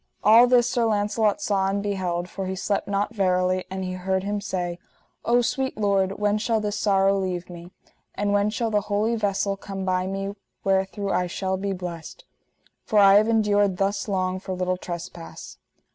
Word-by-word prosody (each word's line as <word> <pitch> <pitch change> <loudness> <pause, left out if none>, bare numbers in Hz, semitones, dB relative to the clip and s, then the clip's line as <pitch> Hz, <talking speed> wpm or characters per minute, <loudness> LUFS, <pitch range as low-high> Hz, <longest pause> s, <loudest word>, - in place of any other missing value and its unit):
All 225 +4 +7
this 245 -1 +4
Sir 240 -1 +1
Launcelot 210 +4 +1
saw 195 -5 +1
and 200 +1 -1
beheld, 180 -4 -2
for 190 0 -5
he 190 - -3
slept 200 +2 -2
not 200 +2 -1
verily; 185 -2 +1
and 190 0 -4
he 185 - -3
heard 190 +1 -1
him 205 +1 -2
say: 180 -4 -3 0.5
O 240 +1 +4
sweet 265 +3 -2
Lord, 195 -2 +1
when 210 +1 0
shall 225 0 +1
this 210 -1 -2
sorrow 195 -1 +2
leave 185 -2 -3
me? 170 0 -10 0.5
and 205 0 0
when 205 +1 +2
shall 225 +1 -2
the 210 -1 +2
holy 215 +3 +1
vessel 200 -2 0
come 195 -1 -6
by 185 0 0
me, 195 +1 -3 0.3
wherethrough 195 +1 0
I 180 - +1
shall 190 +2 -2
be 195 +1 -3
blessed? 180 - -7 0.6
For 215 - -1
I 200 -1 +8
have 215 +1 +4
endured 205 -4 +2
thus 200 +1 -1
long, 185 -2 -1
for 185 -1 -5
little 185 0 -1
trespass. 170 -2 -8
195 Hz, 185 wpm, -24 LUFS, 185-210 Hz, 0.6 s, I